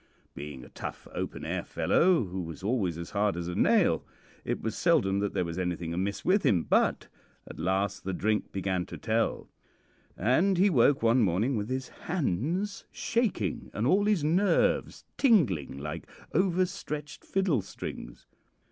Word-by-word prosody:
Being 70 -2 -8
a - - -14
tough, - - -7
open - - -4
air - - -2
fellow, 180 -5 +3
who 95 -1 -4
was 85 +2 -8
always 100 -7 0
as 85 0 -7
hard 100 -3 +1
as 85 -1 -3
a 90 - -3
nail, - - +3 0.4
it - - -2
was - - -3
seldom 95 +1 +2
that 100 0 -2
there 90 - +1
was 85 +2 -4
anything 85 -2 -2
amiss 95 +3 -2
with 195 +3 +4
him; 85 -5 +3
but - - +2 0.4
at - - -10
last 95 +3 0
the 95 - -2
drink 105 +3 -1
began 95 -2 -2
to - - -8
tell, 115 0 -1 0.7
and 160 - +3
he 195 +2 +4
woke 135 -2 +4
one 115 +2 +4
morning 105 +7 +1
with 105 +1 -2
his 130 0 -3
hands 175 - -2
shaking 205 - -1
and 105 - 0
all 195 +9 +3
his 205 -7 +2
nerves 195 +9 +2
tingling 110 - +3
like 75 +2 -6 0.3
over 185 +1 +3
stretched 150 -6 -6
fiddle 190 - +1
strings. 75 -9 -8
110 Hz, 165 wpm, -29 LUFS, -, 0.7 s, with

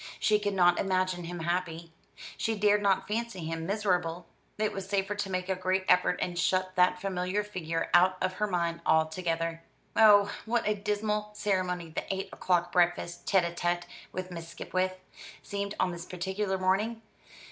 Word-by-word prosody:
She 210 -1 +3
could 205 -1 -1
not 175 -1 +4
imagine 185 -2 0
him 175 0 -5
happy: 170 -1 -2 0.4
she 225 -1 -1
dared 210 0 +3
not 195 -1 +2
fancy 225 -2 -3
him 165 0 -4
miserable. 180 -4 0 0.3
It 215 0 0
was 195 0 -6
safer 195 0 0
to 205 -1 -3
make 185 -1 -2
a 190 - +1
great 185 +1 0
effort 180 0 +4
and 175 -1 -3
shut 185 +1 +1
that 180 0 +4
familiar 185 +1 -1
figure 165 -5 -3
out 185 +1 +5
of 185 0 0
her 210 - +3
mind 170 -3 -1
altogether. 165 +1 0 0.3
Oh, 205 -2 +7 0.2
what 235 0 +1
a 210 - +3
dismal 210 +1 -1
ceremony 185 -5 -1
the - - -4
eight 195 0 -3
o'clock 175 -1 +1
breakfast, 175 -1 +1
tête 190 -3 +4
à 170 0 -4
tête 175 0 0 0.3
with 185 0 -5
Miss 165 -1 -7
Skipwith, 185 +2 -2 0.5
seemed 200 0 -4
on 180 - +2
this 170 0 -7
particular 190 +2 -2
morning! 210 +5 0
185 Hz, 170 wpm, -29 LUFS, 175-205 Hz, 0.5 s, Oh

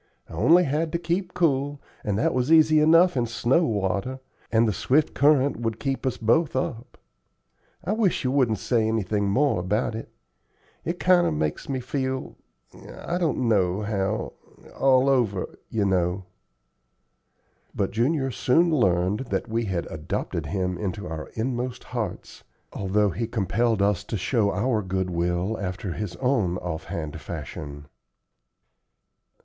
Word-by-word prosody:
I - - -12
only 165 - +5
had 155 +2 -1
to - - +2
keep 175 +2 -2
cool, 145 -4 +1 0.2
and 100 -3 -1
that 110 - +1
was 130 +4 0
easy 155 -1 +6
enough 165 +3 +5
in 120 -2 +1
snow 120 +8 +2
water, 105 +3 -1 0.3
and 115 0 +4
the 105 - +1
swift 145 +10 +1
current 145 -1 +3
would 115 -1 -3
keep 135 -1 -2
us 130 - -1
both 135 +8 +2
up. 125 -2 -3 0.9
I 190 - -2
wish 215 -8 +1
you 130 - 0
wouldn't 130 -6 +2
say 115 +2 +1
anything 105 -2 0
more 135 0 +2
about 105 +6 -1
it. 115 - -6 0.7
It 170 +2 -3
kinder 180 -1 +4
makes 75 - -2
me 135 -1 -1
feel 130 0 -3 0.6
I 175 +1 -3
don't 150 -7 0
know 100 -2 +2
how 105 0 -2 0.4
all 135 0 +4
over, 115 -9 0
you 105 -3 0
know." 90 0 0 1.5
But 100 - -1
Junior 135 +4 0
soon 165 +8 +2
learned 95 - +1
that - - -1
we 115 +1 -1
had 95 -4 -2
adopted 75 0 -3
him 90 -2 -2
into 100 0 -4
our 80 0 -6
inmost 125 +1 -3
hearts, 115 -7 -5 0.3
although 100 +1 +1
he 115 +5 -3
compelled 110 0 0
us 100 -3 +1
to 110 - -3
show 105 +2 +1
our 110 +3 0
good 95 -1 -2
will 90 +5 -1
after 95 -1 -4
his 105 -2 -5
own 120 -10 +1
off 80 -3 -5
hand 80 -2 -5
fashion. 70 0 -7
115 Hz, 150 wpm, -25 LUFS, 95-135 Hz, 1.5 s, easy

